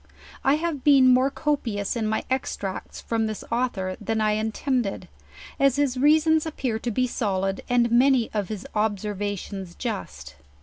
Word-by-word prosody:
I 270 +2 +4
have 310 -3 -3
been 265 -3 +6
more 255 +2 +4
copious 245 -10 -2
in 225 -2 -1
my 220 0 -1
extracts 205 -7 -3
from 225 -1 -1
this 215 -1 -5
author 220 -6 -1
than 225 -1 -1
I 215 0 +2
intended, 220 +1 -1 0.5
as 275 -2 +4
his 285 -3 +1
reasons 315 +3 +4
appear 255 -7 -2
to 240 - -3
be 255 +3 +1
solid, 195 -5 -1
and 240 -1 +3
many 250 0 +4
of 205 -3 -2
his 210 -3 -5
observations 205 -3 -3
just. 225 -5 -6
235 Hz, 155 wpm, -25 LUFS, 210-265 Hz, 0.5 s, been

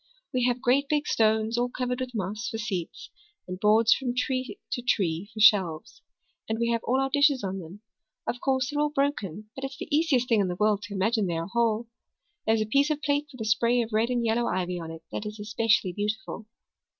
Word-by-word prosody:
We 250 -1 +2
have 250 0 0
great 270 +3 +2
big 295 -1 +1
stones, 220 +1 +2
all 245 +1 +1
covered 250 0 -3
with 255 -1 -5
moss, 210 +3 -3
for 225 - -4
seats, 195 -7 -5 0.4
and 185 0 -6
boards 215 +2 +5
from 250 -2 -3
tree 255 +1 -2
to 245 - -2
tree 190 -5 0
for 220 - -9
shelves. 175 - +4 0.5
And 220 - 0
we 235 0 0
have 230 -1 0
all 260 +2 +2
our 270 0 0
dishes 285 -4 +3
on 195 0 -3
them. 180 +4 -10 0.4
Of 245 - -3
course, 260 -1 0
they're 295 - -2
all 300 0 +2
broken 220 - -2
but 270 - -7
it's 270 0 -5
the - - -2
easiest 290 -6 +2
thing 230 -4 +3
in 195 - +1
the 180 - -3
world 210 +1 +2
to 205 - -7
imagine 210 +1 +1
that 170 - -1
they - - -1
are 165 - -2
whole. 235 -1 +1 0.6
There's 220 0 +3
a - - +1
piece 280 +7 +2
of 305 - +1
a - - -28
plate 290 0 0
with 255 -4 -10
a - - -2
spray 235 +2 +2
of 225 -1 -8
red 220 +2 +2
and 240 -2 0
yellow 230 +1 +1
ivy 180 0 -1
on 165 -1 -7
it 165 0 -9
that 210 - -4
is 210 0 -8
especially 210 -3 +1
beautiful. 210 +2 -4
225 Hz, 235 wpm, -27 LUFS, 205-255 Hz, 0.6 s, boards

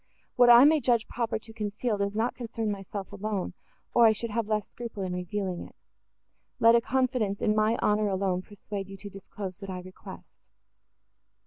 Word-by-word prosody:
What 245 -1 +6
I 240 +1 +10
may 310 +2 +6
judge 240 -5 +2
proper 235 -2 -2
to 220 +1 -12
conceal, 210 0 -2
does 200 +1 -1
not 225 +3 0
concern 230 -3 -3
myself 195 0 -6
alone, 205 -2 -3 0.4
or 235 -1 +7
I 220 - +5
should 230 +1 -5
have 225 0 -1
less 210 -2 -1
scruple 230 -4 -6
in 185 -1 -3
revealing 180 0 -3
it: - - -11 0.8
let 230 0 +7
a 235 - +5
confidence 250 -6 0
in 210 - +1
my 215 +2 +2
honour 210 0 +2
alone 190 -2 0
persuade 200 0 -7
you 195 - -9
to 205 +1 -9
disclose 195 -1 -8
what 195 - -7
I 185 -1 -5
request." 185 +1 -13
210 Hz, 185 wpm, -28 LUFS, 195-230 Hz, 0.8 s, I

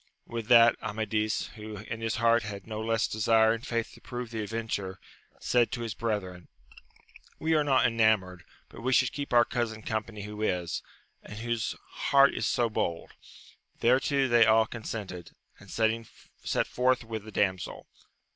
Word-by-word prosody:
With 115 -2 -5
that, 120 -1 +7
Amadis, 110 0 -1
who 110 -1 -9
in 110 +3 -7
his 115 0 -1
heart 115 0 +3
had 100 -3 -7
no 110 -1 -5
less 115 0 +1
desire 110 +1 +3
and 115 +1 -5
faith 115 -3 -2
to - - -16
prove 120 -2 -6
the 110 -1 -3
adventure, 105 -3 -4 0.4
said 120 -1 +2
to 120 - -3
his 115 -2 -3
brethren. 100 -6 -3 0.9
We 160 +1 0
are 155 -1 +3
not 135 -3 +3
enamoured, 110 -6 +2 0.2
but - - -12
we 130 +2 0
should 130 -1 +4
keep 145 -1 -5
our 120 -1 +6
cousin 110 -3 -3
company 110 -1 -4
who 105 +1 -7
is, 90 -5 -1 0.4
and 105 - -10
whose 120 +2 -2 0.3
heart 140 0 +6
is 110 - -1
so 120 - +2
bold. 85 -6 -3 0.7
Thereto 135 +3 +3
they 120 -1 +5
all 110 0 +5
consented, 105 -6 -7 0.2
and - - -15
set 110 0 -2
forth 125 0 +1
with 110 -2 -6
the 110 - -10
damsel. 95 -3 -1
110 Hz, 165 wpm, -29 LUFS, 105-120 Hz, 0.9 s, that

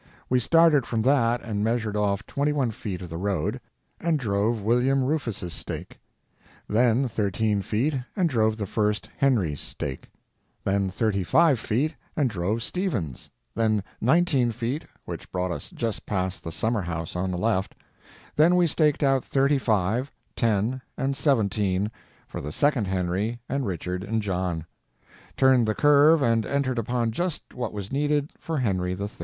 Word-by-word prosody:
We 125 - +4
started 160 0 +4
from 115 -2 0
that 120 -3 +3
and 105 -3 -2
measured 110 -2 0
off 100 -1 0
twenty 145 +1 0
one 135 -5 0
feet 95 -4 -5
of 90 - -8
the 80 - -4
road, 95 -5 -1 0.4
and 165 -2 +1
drove 110 -2 0
William 125 +5 +2
Rufus's 120 - -2
stake; - - -6 0.7
then 120 +4 +3
thirteen 105 -1 0
feet 115 +10 0 0.2
and 185 -4 +2
drove 110 -6 +1
the 105 - -2
first 105 +1 -1
Henry's 105 - +1
stake; 65 -3 -6 0.5
then 100 0 +1
thirty 100 0 0
five 150 - +4
feet 130 +9 0 0.2
and 140 -6 +2
drove 105 +5 -1
Stephen's; 120 - -3 0.2
then 110 -3 +1 0.2
nineteen 135 -3 +3
feet, 120 +6 -3 0.2
which - - -7
brought 90 0 -1
us - - -5
just 115 -3 -4
past 95 -2 -2
the 85 - -5
summer 110 +5 0
house 85 -2 -4
on 90 +1 -1
the 90 - -2
left; 105 0 0 0.6
then 160 +4 +5
we 180 -1 +4
staked 150 -2 +2
out 135 -2 +3
thirty 140 +1 +2
five, 110 +3 +1 0.3
ten, 115 +3 +1 0.2
and 135 +1 0
seventeen 105 -7 +1 0.4
for - - -6
the 75 - -5
second 135 - +2
Henry 95 +5 -1
and 135 -3 -1
Richard 90 0 -3
and 110 +1 -1
John; 90 -4 -2 0.7
turned 130 -3 +5
the 110 - 0
curve 145 +1 +5
and 115 -2 +3
entered 135 -3 0
upon 115 0 0
just 170 +6 -3
what 125 -3 -3
was 100 -1 -6
needed 145 +1 0
for 165 -1 -3
Henry 95 -8 0
III. 100 - -2
115 Hz, 160 wpm, -26 LUFS, 100-135 Hz, 0.7 s, then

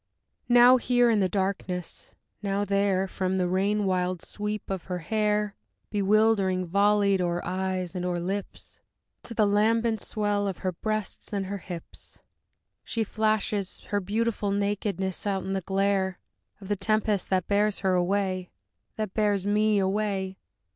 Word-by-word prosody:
Now 245 +1 +8
here 245 -1 +3
in 215 - +3
the 190 -2 +2
darkness, 190 -2 -3 0.3
now 200 0 0
there, 200 -1 +1
From 190 0 -1
the 180 -1 +1
rain 200 +3 +1
wild 180 -2 0
sweep 210 0 -4
of 190 -3 -4
her 180 -1 -3
hair, 210 +3 0 0.4
Bewilderingly 200 -3 +2
volleyed 200 +1 +3
o'er 175 -1 0
eyes 185 -1 -2
and 180 -2 -3
o'er 180 -1 -1
lips, 195 +3 -5 0.4
To 230 - -8
the 215 - +4
lambent 220 +2 +2
swell 205 -1 -1
of 190 -1 -5
her - - +3
limbs, 175 - -8
her - - -53
breasts 215 -1 -3
and 200 -1 -1
her 200 +1 -4
hips, 175 -2 -10 0.7
She 230 - -1
flashes 215 -2 -1
her 205 - +1
beautiful 210 +2 -1
nakedness 200 -1 -1
out 195 -2 0
in 195 - -3
the 195 - -1
glare 195 0 0 0.4
Of 195 - -10
the 205 - +2
tempest 210 0 0
that 185 -2 +1
bears 205 0 +1
her 190 -1 +2
away, 185 0 0 0.5
That 215 -3 -3
bears 205 -3 +1
me 210 +1 +3
away! 195 -1 -1
200 Hz, 155 wpm, -27 LUFS, 190-210 Hz, 0.7 s, Now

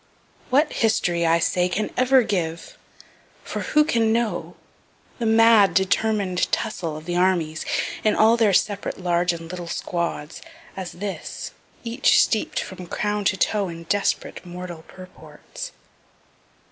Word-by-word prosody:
What 290 +4 +3
history, 175 -7 +1
I 165 +1 +4
say, 180 +2 +1
can 210 +4 -2
ever 255 0 +4
give 170 -6 -3 0.7
for - - -5
who 300 0 +3
can 230 -7 +1
know 230 -1 -1 0.6
the 230 - 0
mad, 220 -5 +5
determin'd 190 -1 +1
tussle 170 -8 -2
of 155 - -11
the 175 0 -3
armies, 175 -4 +1 0.4
in 215 - +3
all 220 +2 +5
their 225 -3 +3
separate 200 +1 0
large 175 -1 +1
and 165 -1 -7
little 175 -2 -6
squads 170 -3 -4 0.3
as 190 -2 -6
this 200 +2 -6 0.3
each 240 +3 +3
steep'd 220 - +1
from 185 -1 -7
crown 210 +2 -2
to 190 - +2
toe 200 +1 +1
in 165 0 -8
desperate, 200 0 -1
mortal 175 -2 -8
purports? 185 - -11
190 Hz, 135 wpm, -23 LUFS, 175-220 Hz, 0.7 s, mad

